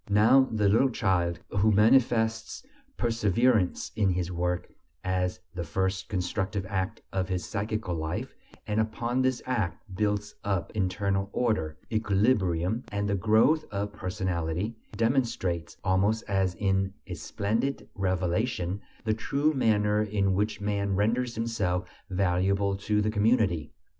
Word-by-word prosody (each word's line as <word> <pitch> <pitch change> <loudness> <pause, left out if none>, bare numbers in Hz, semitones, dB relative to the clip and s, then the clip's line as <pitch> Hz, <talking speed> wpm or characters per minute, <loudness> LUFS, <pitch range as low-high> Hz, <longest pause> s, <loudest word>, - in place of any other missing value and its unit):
Now 115 +6 +5
the 105 -2 +2
little 115 +7 +4
child 90 -7 0
who 100 +2 +3
manifests 115 - +3 0.3
perseverance 115 -2 +1
in 105 -3 +2
his 90 -1 -1
work 90 0 -2 0.3
as 90 0 -1
the 90 -2 -3
first 95 +3 -2
constructive 95 +1 -2
act 95 -1 -3
of 95 -1 -1
his 90 -1 -2
psychical 105 -2 -2
life, 80 -1 -3 0.3
and 105 +1 0
upon 120 +3 -1
this 130 -1 0
act 100 -9 -1
builds 105 +1 -1
up 95 -4 -1
internal 100 0 0
order, 80 -11 0
equilibrium, 105 -2 +1
and 100 0 -1
the 100 - 0
growth 110 - +4
of 100 0 -3
personality, 90 +2 -2 0.2
demonstrates, 115 - 0
almost 100 +4 +2
as 95 -3 +1
in 95 -1 0
a 90 - -6
splendid 105 - -2
revelation, 95 +1 -1 0.2
the 110 -1 +1
true 140 +7 0
manner 105 -5 +2
in 100 -2 +1
which 105 +2 0
man 100 -1 -1
renders 115 +4 +1
himself 100 -6 -1 0.2
valuable 95 +1 +1
to 105 +2 0
the 110 - +1
community. 105 - +2
100 Hz, 130 wpm, -28 LUFS, 95-110 Hz, 0.3 s, Now